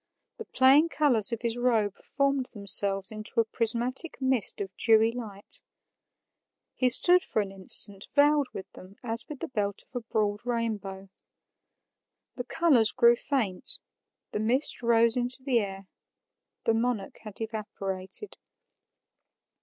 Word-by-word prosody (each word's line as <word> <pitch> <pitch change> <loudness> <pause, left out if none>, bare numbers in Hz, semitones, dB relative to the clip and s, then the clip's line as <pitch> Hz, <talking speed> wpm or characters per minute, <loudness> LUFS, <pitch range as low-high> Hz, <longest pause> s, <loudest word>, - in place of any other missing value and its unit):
The - - -8
playing 275 +5 +4
colors 250 -9 +1
of 230 - -4
his 235 0 -2
robe 225 -5 +1
formed 275 -2 -1
themselves 200 -1 +4
into 215 +2 -5
a 230 - +3
prismatic 240 +7 +1
mist 260 -5 0
of 195 -2 -6
dewy 225 0 +3
light; 215 -5 -9 1.1
he 255 - +1
stood 355 +8 +6
for 220 - -2
an 200 -2 -3
instant 195 +1 -7
veiled 290 -1 +3
with 190 - -8
them 185 +2 -15
as 230 -1 -2
with 295 -3 -9
the - - -2
belt 205 -5 -3
of - - -25
a - - -1
broad 210 -1 -1
rainbow. 210 -5 -4 1.3
The 245 - -6
colors 265 -9 +3
grew 240 -1 +4
faint; 235 -8 -3 0.5
the - - -3
mist 245 +7 +3
rose 230 -1 +3
into 250 +1 +2
the 255 -3 +1
air; 195 -2 -6 0.8
the 225 - +1
monarch 225 -3 -3
had 215 -3 -11
evaporated. 205 - -5
230 Hz, 140 wpm, -27 LUFS, 205-255 Hz, 1.3 s, stood